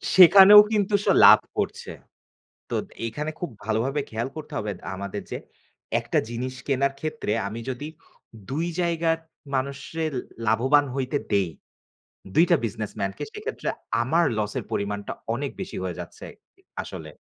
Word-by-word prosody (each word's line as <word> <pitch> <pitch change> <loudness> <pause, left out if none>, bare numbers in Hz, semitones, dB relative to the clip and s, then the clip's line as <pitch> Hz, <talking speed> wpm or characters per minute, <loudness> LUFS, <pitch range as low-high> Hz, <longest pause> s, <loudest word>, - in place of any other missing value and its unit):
সেখানেও 195 +3 +10
কিন্তু 205 -1 +1
সে - - +4
লাভ - - +10 0.2
করছে। - - -3 0.8
তোদ - - -1 0.2
এইখানে 150 +7 -3
খুব 175 - -3
ভালোভাবে 115 +7 0
খেয়াল 115 +3 -2
করতে 155 0 -8
হবে 105 -4 -4 0.2
আমাদের 100 +1 -5
যে - - -3 0.6
একটা - - 0
জিনিস 125 +2 -4
কেনার 140 0 +1
ক্ষেত্রে, 155 -8 -3 0.2
আমি 115 +3 -6
যদি 130 +4 -5 0.6
২ 160 +5 -1
জায়গার 165 -1 +1 0.4
মানুষরে 140 +4 -3 0.4
লাভবান 135 +7 +4
হইতে 135 +1 -1 0.2
দেই, 100 -3 +3 0.9
২ 165 - +6
টা 170 - +8
বিজনেসম্যানকে, 100 -2 -4
সেইক্ষেত্রে - - -4 0.3
আমার 165 +7 +2
লসের 105 -1 -2
পরিমাণটা 100 0 -3 0.2
অনেক 140 +1 -3
বেশি 185 - -6
হয়ে 90 -3 -4
যাচ্ছে, - - -9 0.6
আসলে। - - -8
135 Hz, 130 wpm, -25 LUFS, 110-160 Hz, 0.9 s, সেখানেও